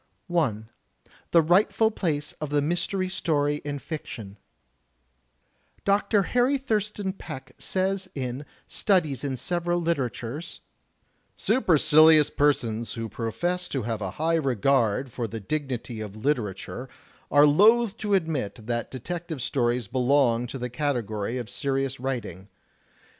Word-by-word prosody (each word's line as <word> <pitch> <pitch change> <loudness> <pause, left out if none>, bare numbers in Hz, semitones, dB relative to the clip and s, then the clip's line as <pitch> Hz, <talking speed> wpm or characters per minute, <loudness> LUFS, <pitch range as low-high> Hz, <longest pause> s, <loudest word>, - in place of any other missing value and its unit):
I. 115 -11 +1 0.7
The 165 -1 +5
Rightful 205 +6 +3
Place 150 -8 -2
of 150 - -3
the 145 0 +2
Mystery 175 +5 0
Story 150 -6 0
in 145 -1 -5
Fiction 110 -10 -7 1.5
Dr. 200 +1 +3
Harry 250 +7 +2
Thurston 210 -6 -2
Peck 130 -8 -9
says 190 0 -1
in 130 0 -4 0.2
"Studies 160 - +1
In 135 -2 -2
Several 175 +4 -1
Literatures": 140 -3 -3 0.7
"Supercilious 155 - +5
persons 120 -6 +1
who 115 -1 -4
profess 175 - -2
to 135 -8 -3
have 110 -1 -3
a 95 - -2
high 160 +2 +1
regard 130 -3 +1
for 120 -1 -3
the 115 +1 -6
dignity 125 -2 -4
of 105 -2 -6
^literature' 115 0 -2 0.4
are 145 0 +6
loath 215 +8 +5
to 205 -2 +1
admit 135 - -2
that 120 0 -2
detective 165 +4 -5
stories 120 -1 0
belong 125 -1 +2
to 135 - -6
the 125 -1 -4
category 120 -5 -2
of 120 -3 -4
serious 135 +1 -2
writing. 115 -8 -4
145 Hz, 125 wpm, -26 LUFS, 120-175 Hz, 1.5 s, are